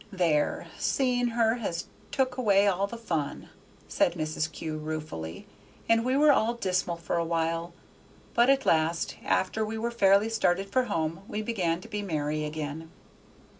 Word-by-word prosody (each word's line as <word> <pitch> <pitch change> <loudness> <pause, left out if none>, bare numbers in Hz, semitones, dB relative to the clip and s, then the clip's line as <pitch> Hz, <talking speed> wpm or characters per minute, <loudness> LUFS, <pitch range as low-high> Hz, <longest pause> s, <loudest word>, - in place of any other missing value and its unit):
There! 170 -6 +1
seeing 250 -2 +1
her 230 0 +2
has 175 -8 -3 0.2
took 260 -2 0
away 205 -6 +4
all 200 0 +2
the 235 - -7
fun," 165 -11 -3 0.4
said - - +2
Mrs. 155 0 -2
Kew 155 -2 -5
ruefully; 150 - -5 0.4
and 230 0 +4
we 255 +2 +1
were 300 +1 +6
all 235 -3 +2
dismal 185 -5 0
for 170 0 -3
a 170 - +1
while, 165 +1 -1 0.6
but 240 +2 +4
at 275 -1 +3
last, 165 +1 +1
after 205 +4 +1
we 220 +1 -3
were 235 +2 -2
fairly 200 -2 +4
started 195 -3 0
for 255 +3 +2
home, 165 -6 -2
we 215 - -3
began 180 -7 -1
to 225 - -11
be 210 -2 -3
merry 155 -5 -2
again. 155 +1 -5
190 Hz, 165 wpm, -28 LUFS, 160-230 Hz, 0.6 s, were